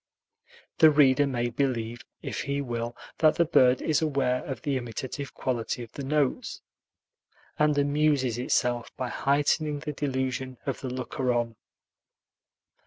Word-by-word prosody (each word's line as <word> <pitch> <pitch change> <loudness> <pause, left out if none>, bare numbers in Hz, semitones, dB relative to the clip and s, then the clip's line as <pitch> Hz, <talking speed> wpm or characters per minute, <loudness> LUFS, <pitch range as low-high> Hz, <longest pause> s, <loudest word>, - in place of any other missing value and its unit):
The 160 - +9
reader 145 -2 +5
may 120 -3 -1
believe, 120 -3 -1 0.2
if - - -3
he 140 0 -2
will, 120 -3 -3 0.2
that 155 -1 +5
the 170 - +3
bird 130 -5 +4
is 155 -1 +2
aware 140 -5 +1
of 135 - -6
the 145 -3 0
imitative 130 +3 -5
quality 120 -1 -2
of 115 - -12
the 140 - -7
notes, 150 - -1 1.0
and 150 -1 +3
amuses 145 -4 +2
itself 120 -1 0
by 130 -1 -2
heightening 145 +3 +1
the 150 -1 -4
delusion 130 -2 -2
of 135 - -2
the 130 - -4
looker 125 0 -2
on. 120 -1 -1
130 Hz, 140 wpm, -27 LUFS, 125-145 Hz, 1.0 s, The